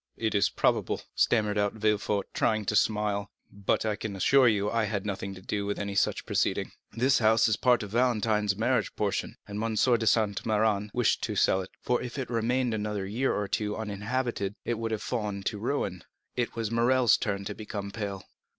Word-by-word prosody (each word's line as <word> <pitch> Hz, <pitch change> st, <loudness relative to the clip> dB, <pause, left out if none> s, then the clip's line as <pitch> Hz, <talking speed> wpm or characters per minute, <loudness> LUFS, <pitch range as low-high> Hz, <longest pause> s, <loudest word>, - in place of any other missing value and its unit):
"It 110 Hz, -1 st, -1 dB
is 100 Hz, -1 st, +3 dB
probable," -, -, 0 dB
stammered 105 Hz, -3 st, +2 dB
out 100 Hz, 0 st, +1 dB
Villefort, 105 Hz, -2 st, 0 dB
trying 110 Hz, -1 st, +1 dB
to 105 Hz, -, 0 dB
smile; 105 Hz, -2 st, +1 dB, 0.2 s
"but 100 Hz, +2 st, -1 dB
I 105 Hz, -1 st, 0 dB
can 105 Hz, -1 st, -5 dB
assure 130 Hz, +7 st, +5 dB
you 105 Hz, -3 st, +2 dB
that 105 Hz, -, -2 dB
I 115 Hz, -, +2 dB
had 105 Hz, -1 st, -3 dB
nothing 100 Hz, -1 st, -4 dB
to 95 Hz, -, -12 dB
do 100 Hz, 0 st, -2 dB
with 100 Hz, -, -2 dB
any 100 Hz, 0 st, -3 dB
such 100 Hz, -, +1 dB
proceeding. -, -, 0 dB, 0.2 s
This 130 Hz, +4 st, +3 dB
house 110 Hz, 0 st, +4 dB
is 110 Hz, -, +2 dB
part 125 Hz, 0 st, +3 dB
of 100 Hz, -, -8 dB
Valentine's 110 Hz, -4 st, +2 dB
marriage 110 Hz, +3 st, 0 dB
portion, -, -, -2 dB
and 105 Hz, +2 st, -4 dB
M. 115 Hz, -1 st, -1 dB
de 115 Hz, -1 st, +3 dB
Saint 105 Hz, -2 st, +2 dB
Méran 105 Hz, -1 st, +1 dB
wished 120 Hz, 0 st, +1 dB
to -, -, -4 dB
sell 95 Hz, -, +3 dB
it; 95 Hz, -, -8 dB
for 125 Hz, -, +1 dB
if 125 Hz, +1 st, -6 dB
it -, -, -1 dB
had 125 Hz, -, -6 dB
remained 120 Hz, +1 st, +1 dB
another 105 Hz, -2 st, -2 dB
year 120 Hz, +7 st, 0 dB
or 105 Hz, -, -1 dB
two 105 Hz, +1 st, -1 dB
uninhabited 110 Hz, 0 st, -2 dB
it 120 Hz, -2 st, -1 dB
would 115 Hz, 0 st, -2 dB
have 110 Hz, -2 st, -3 dB
fallen 105 Hz, -5 st, -3 dB
to 105 Hz, -, -2 dB
ruin." 100 Hz, -, -2 dB, 0.3 s
It 125 Hz, -1 st, -2 dB
was 115 Hz, -2 st, -2 dB
Morrel's 120 Hz, +1 st, +4 dB
turn 100 Hz, -1 st, -2 dB
to 105 Hz, -, -4 dB
become 100 Hz, -1 st, -6 dB
pale. 100 Hz, -3 st, -5 dB
105 Hz, 205 wpm, -28 LUFS, 100-115 Hz, 0.3 s, assure